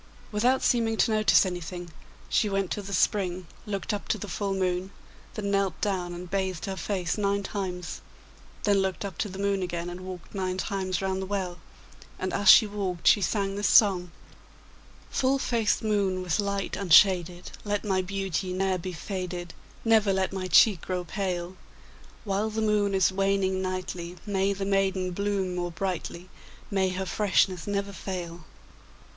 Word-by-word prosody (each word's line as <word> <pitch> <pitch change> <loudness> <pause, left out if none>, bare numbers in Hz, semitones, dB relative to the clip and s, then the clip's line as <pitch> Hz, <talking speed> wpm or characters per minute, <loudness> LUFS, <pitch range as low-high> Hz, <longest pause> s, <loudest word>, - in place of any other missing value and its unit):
Without 245 +5 +2
seeming 225 -2 +2
to 225 - +3
notice 215 -1 +5
anything, 175 -1 -5 0.4
she 210 - +2
went 195 -2 -1
to 205 - -2
the 200 0 -8
spring, 185 -1 +1 0.2
looked 200 -1 -2
up 205 - -4
to - - 0
the 205 - -6
full 195 +1 -2
moon, 185 0 -1 0.5
then 200 -3 -2
knelt 195 -3 0
down 185 -4 -1
and 180 +1 -7
bathed 190 -4 -1
her 195 - -3
face 190 -2 -2
nine 200 0 +1
times, 185 -3 -4 0.6
then 205 -1 +3
looked 190 +1 -1
up 190 -4 -7
to 210 - -1
the 190 - -8
moon 200 -1 0
again 175 -1 -3
and 180 +1 -8
walked 185 -2 -9
nine 185 -2 -2
times 190 -1 -2
round 190 0 -1
the 190 - -4
well, 185 -3 -3 0.6
and 185 0 -3
as 200 - +3
she 220 - +10
walked 195 -4 -4
she 205 - +6
sang 195 +1 0
this 205 -1 0
song: 185 -5 +5 1.0
'Full 265 +1 +2
faced 230 -5 0
moon 200 -4 +1
with 180 +2 0
light 200 -1 -1
unshaded, 180 -1 +4
Let 205 0 -2
my 190 -2 +1
beauty 190 -1 -2
ne'er 190 0 0
be 185 +1 -5
faded. 175 0 -5 0.3
Never 220 -3 +4
let 190 0 0
my 185 -1 -3
cheek 185 0 +6
grow 180 -1 -3
pale! 180 0 -3 0.7
While 205 +1 0
the 220 0 -2
moon 205 -2 +2
is 190 0 +4
waning 195 -1 +1
nightly, 180 -2 -4
May 195 -1 +1
the 195 0 -4
maiden 190 -2 +1
bloom 195 -1 -1
more 175 0 -2
brightly, 180 0 -4 0.4
May 190 -1 +2
her 185 +1 -3
freshness 190 -2 +1
never 200 0 -2
fail! 175 -4 -6
190 Hz, 170 wpm, -27 LUFS, 180-200 Hz, 1.0 s, she